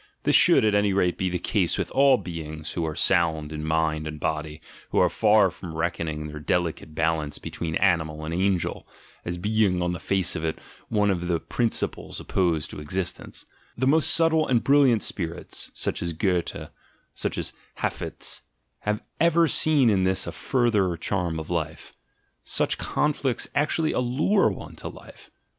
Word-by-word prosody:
This - - +3
should, - - +6
at 105 - +3
any 105 -1 +3
rate, 90 -2 +2
be 95 - -1
the 90 - -1
case - - 0
with - - -3
all 135 -1 +5
be 85 -6 -6
ings 80 0 -7
who 85 - -2
are 80 - -4
sound 80 -4 +2
in 75 0 -5
mind 80 0 0
and 75 0 -6
body, 75 +1 -3 0.3
who - - -2
are - - +4
far 105 -3 +4
from 85 -2 -9
reckoning 80 -2 -2
their 75 0 -7
delicate 80 -1 -2
balance 80 -2 0
between 80 -2 -5
"animal" 80 -5 +1
and 80 - -4
"angel," 95 0 0 0.4
as 85 0 -3
being 105 -1 +1
on 90 0 0
the 90 - -5
face 95 -3 0
of 80 - -4
it 80 -1 -1 0.3
one 105 -2 +2
of 90 -2 -2
the 85 -2 +1
principles 115 +5 -2
op - - -12
posed 85 -5 +1
to - - -7
existence 90 +4 -4 0.2
— - - -33
the 130 - 0
most 155 +4 +4
subtle 160 -1 +4
and 120 -3 +2
brilliant 135 -6 +4
spirits, 85 -2 -3
such - - -2
as 85 -1 -2
Goethe, 90 +1 -1 0.4
such - - -3
as - - -3 0.2
Hafiz, - - -2 0.4
have 105 +2 -2 0.2
even 170 0 +4
seen 150 -3 +4
in 95 -2 +2
this 95 0 +1
a - - -4
further 105 -9 +1
charm 85 -2 -2
of 80 +2 -7
life. 80 -3 -3 0.5
Such - - 0
"conflicts" 145 -4 0
actually 155 +2 +1
allure 135 +12 +2
one - - -8
to - - -6
life. - - -13
90 Hz, 180 wpm, -25 LUFS, 80-110 Hz, 0.5 s, should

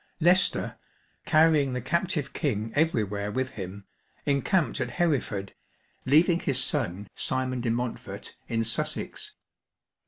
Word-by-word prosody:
Leicester 180 +3 +3 0.5
(carrying 155 -4 +4
the 125 - -1
captive 155 +2 -1
King 115 -7 -1
everywhere 105 -10 0
with 130 +3 -1
him) 100 -4 -7 0.4
encamped 145 +5 +1
at - - -1
Hereford, 130 - -1 0.5
leaving 165 +5 +5
his 135 -7 -1
son, 105 - 0
Simon 130 -1 -1
de 120 - -1
Montfort, 120 +1 -4
in 115 -1 0
Sussex. 115 - -3
130 Hz, 115 wpm, -27 LUFS, 115-155 Hz, 0.5 s, leaving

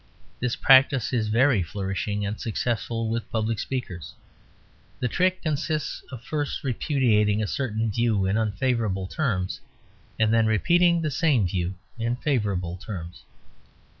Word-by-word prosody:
This 125 -1 -1
practice 135 -2 +5
is 115 -3 +1
very 120 0 +3
flourishing 100 +3 -3
and 105 +2 -4
successful 115 0 -2
with 115 +1 -3
public 110 -1 -1
speakers. 95 -11 -5 0.8
The 125 - 0
trick 185 +7 +1
consists 155 -1 -2
of 125 -3 -8
first 145 +1 -3
repudiating 115 -6 +2
a - - 0
certain 110 -1 -1
view 110 -3 +1
in 95 +2 +1
unfavourable 110 -3 0
terms, 95 -6 -2 0.6
and 110 0 +2
then 115 -1 +4
repeating 170 - +3
the 155 - -1
same 135 -6 +2
view 90 +1 -2 0.2
in 115 +1 0
favourable 100 - -1
terms. 90 -3 -8
115 Hz, 135 wpm, -25 LUFS, 100-130 Hz, 0.8 s, practice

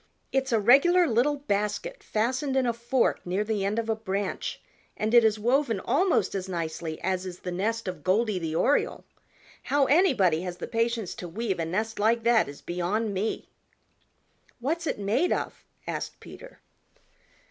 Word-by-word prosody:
It's 265 -1 0
a 225 - +3
regular 280 - +5
little 255 +3 +2
basket 275 - -2
fastened 260 +5 -1
in 260 - +2
a 235 - +1
fork 235 +2 0
near 185 +4 -1
the 210 -2 -1
end 200 +3 -1
of 230 -1 -1
a 225 - +1
branch 200 -2 -3 0.4
and 215 +2 -1
it 240 -1 +8
is 220 -1 +3
woven 240 0 +1
almost 325 - +1
as 190 -1 -4
nicely 165 -2 -4
as 185 0 -1
is 180 -1 -8
the 180 - -4
nest 220 +5 -2
of 180 -5 -5
Goldy 205 +2 +1
the 160 -2 -3
Oriole. 275 - +1 0.6
How 285 -1 +2
anybody 255 - +3
has 180 -1 -5
the - - -5
patience 230 -3 -1
to 180 - -7
weave 195 0 -2
a 165 - 0
nest 215 +7 -2
like 225 +2 +2
that 235 -6 +3
is 140 - -11
beyond 195 +5 -1
me." 200 +4 -2 1.1
"What's 320 +7 -2
it - - -1
made 220 - +1
of?" - - -2 0.2
asked - - -5
Peter. - - -13
220 Hz, 170 wpm, -27 LUFS, 190-250 Hz, 1.1 s, it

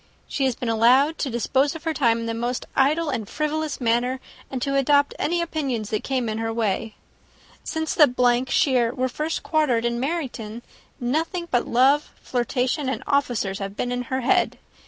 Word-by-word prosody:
She 275 - -1
has 260 -3 +1
been 245 - -5
allowed 250 +7 +4
to 280 - -1
dispose 265 +5 +1
of 325 - -8
her 325 -1 -1
time 230 -6 +2
in - - -4
the 230 - -2
most 240 +2 -2
idle 300 +3 +2
and 220 -6 -3
frivolous 305 0 -2
manner, 245 +2 +1 0.3
and 265 - -3
to 275 0 -1
adopt 285 +1 +3
any 340 +2 +1
opinions 270 -10 -3
that 215 - -1
came 260 -3 -1
in 215 0 -2
her 225 0 -1
way. 225 -1 -1 0.7
Since 320 0 -2
the 250 -6 +4
shire 255 -6 +2
were 255 -1 0
first 305 +6 -3
quartered 275 -8 +1
in 235 0 0
Meryton, 250 -6 -4 0.4
nothing 325 +8 -1
but 245 -1 +1
love, 270 +5 +3
flirtation, 255 +3 -1
and 265 - -3
officers, 245 -9 0
have 195 0 -6
been 245 - -2
in 245 0 -1
her 260 0 -1
head. 240 - +2
255 Hz, 180 wpm, -24 LUFS, 235-295 Hz, 0.7 s, allowed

